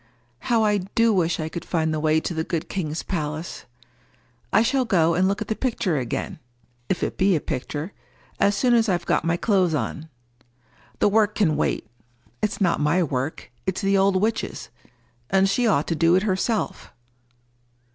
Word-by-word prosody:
How 230 - +1
I 210 -1 +2 0.2
do 230 -1 +4
wish 170 -3 +1
I 155 - -2
could 170 +1 -6
find 160 -3 -1
the 155 - -1
way 155 0 +2
to 175 - -3
the 160 -1 -1
good 165 0 -3
king's 160 -4 -3
palace! 155 -2 -4 0.9
I 220 - +4
shall 260 +3 +2
go 170 -8 +2
and 180 +3 +2
look 200 +2 -1
at - - -21
the 220 - -1
picture 215 - -1
again—if 120 +4 -6
it - - -3
be 190 -1 +4
a - - +1
picture—as 155 +8 -4
soon 245 +4 +2
as 230 -2 +3
I've 175 -2 0
got - - +1
my 165 +1 +1
clothes 185 -5 +2
on. 150 +5 -4 0.9
The - - +3
work 215 0 +2
can 165 -8 +2
wait. 150 - -1 0.6
It's 210 - -1
not 180 -4 +2
my 150 +5 +2
work. 135 -1 -3 0.2
It's 190 +1 -1
the 195 0 +2
old 195 0 +3
witch's; 220 +3 -2 0.6
and 195 +1 +3
she 235 +5 +1
ought 155 -9 +2
to 165 - -1
do 165 +2 +4
it 190 - +2
herself." 210 +2 -1
180 Hz, 175 wpm, -24 LUFS, 155-205 Hz, 0.9 s, do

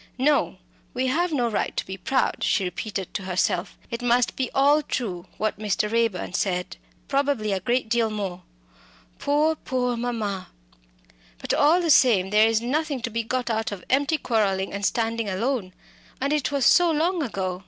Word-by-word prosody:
"No, 285 +3 +2 0.4
we 255 +1 0
have 330 +7 +1
no 250 -6 +1
right 220 - -2
to - - -1
be 190 - -6
proud," 255 +8 0
she 200 - +2
repeated 190 +1 -4
to - - -3
herself. 185 0 -1
"It 235 +1 -4
must 245 0 +2
be 260 -2 -2
all 285 +3 +5
true 195 -11 -4
what 215 -1 -2
Mr. 210 0 -1
Raeburn 230 -6 0
said 180 -3 -1 0.3
probably 275 -6 0
a 195 - 0
great 240 +5 0
deal 230 0 +1
more. 195 -4 -4 0.8
Poor, 300 +2 +2
poor 250 -4 -2
mamma! 220 -6 -3 0.9
But, - - -3
all 310 +5 +4
the 335 -2 +2
same, 200 -9 +4
there 215 +1 +5
is 225 0 +1
nothing 285 0 -1
to 235 - -3
be 230 +1 -1
got 245 +1 -2
out 220 0 -1
of 195 -3 -7
empty 285 +4 +2
quarrelling 200 -7 0
and 200 0 -4
standing 225 0 0
alone. 210 0 -1 0.5
And 280 +3 0
it 295 -2 0
was 280 -3 +1
so 350 -1 +6
long 330 +3 +1
ago." 190 -8 -3
230 Hz, 175 wpm, -24 LUFS, 200-275 Hz, 0.9 s, so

